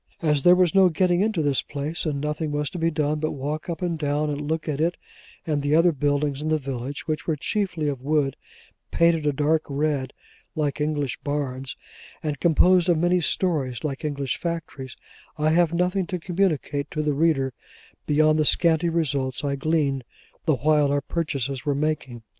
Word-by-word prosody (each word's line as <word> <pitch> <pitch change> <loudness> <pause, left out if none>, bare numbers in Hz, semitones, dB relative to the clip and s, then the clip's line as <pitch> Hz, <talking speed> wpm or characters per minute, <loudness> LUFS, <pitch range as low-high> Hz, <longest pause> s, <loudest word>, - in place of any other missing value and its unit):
As 150 -3 +2
there 175 +5 +7
was 180 -3 +3
no 190 -2 +6
getting 175 +2 +2
into 210 -6 +1
this 140 -2 +2
place, 155 +4 -4
and 145 -2 -1
nothing 150 +1 -2
was 145 -1 -2
to 180 - -6
be 165 0 +2
done 150 -1 -1
but 155 +1 -1
walk 150 +4 -4
up 170 +2 -4
and 170 -3 -1
down, 150 0 0
and 145 0 -3
look 160 0 -2
at 150 -1 -2
it 170 +2 +1 0.5
and 150 -3 0
the 145 +2 +2
other 170 +2 +5
buildings 145 -1 0
in 155 - -2
the 155 - +3
village 135 -1 -5
(which 155 -1 -3
were 160 - +1
chiefly 175 0 -1
of 140 -3 -3
wood, 145 -1 +1 0.5
painted 165 -2 +2
a - - +4
dark 150 +3 +1
red 140 -2 -1 0.4
like 150 -1 -1
English 150 -3 -1
barns, 135 -2 -3 0.5
and 150 -3 -2
composed 175 +2 +4
of 170 - +4
many 175 +2 +2
stories 150 -8 -1
like 145 -1 -4
English 140 -4 -2
factories), 160 -6 -5 0.4
I 155 +1 +2
have 170 0 +3
nothing 180 +2 0
to 180 -3 -3
communicate 160 -5 -1
to 155 0 -2
the 150 -1 +1
reader, 140 -3 +1 0.5
beyond 155 +1 +3
the - - +4
scanty 170 +1 +3
results 140 -6 -1
I 140 -1 0
gleaned 140 -2 0 0.4
the 155 -4 +3
while 150 +2 +2
our 145 0 +1
purchases 140 -5 -3
were 145 -1 0
making. 140 -5 -2
150 Hz, 190 wpm, -24 LUFS, 140-165 Hz, 0.5 s, there